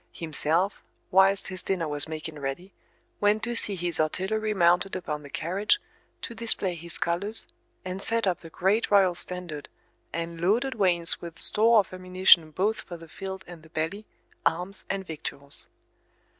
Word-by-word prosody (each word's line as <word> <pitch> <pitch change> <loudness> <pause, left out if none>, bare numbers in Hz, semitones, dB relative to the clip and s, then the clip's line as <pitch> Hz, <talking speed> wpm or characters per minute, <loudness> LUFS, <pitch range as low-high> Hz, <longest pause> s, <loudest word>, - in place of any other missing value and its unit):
Himself, 165 +4 0 0.3
whilst 195 +1 +4
his 185 -1 -1
dinner 180 -4 -1
was 145 0 -1
making 155 -1 -6
ready, 140 +8 -5 0.5
went 210 +1 +2
to 240 - -1
see 210 -3 +2
his 175 -2 -2
artillery 195 +7 0
mounted 180 0 +3
upon 150 -5 -4
the 145 - -11
carriage, 195 - +1 0.4
to - - -5
display 220 -5 0
his 170 0 -4
colours, 200 +6 +1 0.4
and 185 +1 -4
set 230 +1 +1
up 185 -2 0
the 165 - -10
great 195 +7 +1
royal 195 -3 +5
standard, 175 -4 -5 0.4
and 165 0 -4
loaded 235 +9 +2
wains 180 -5 +3
with 170 -1 -8
store 225 +2 +4
of 200 -3 +2
ammunition 185 -3 +5
both 195 +8 0
for 175 - -9
the 165 0 -13
field 190 +4 -7
and 175 -2 -11
the 160 - -17
belly, 170 +6 -3 0.4
arms 180 +4 +1
and 195 0 -2
victuals. 145 -3 -4
180 Hz, 160 wpm, -27 LUFS, 165-200 Hz, 0.5 s, royal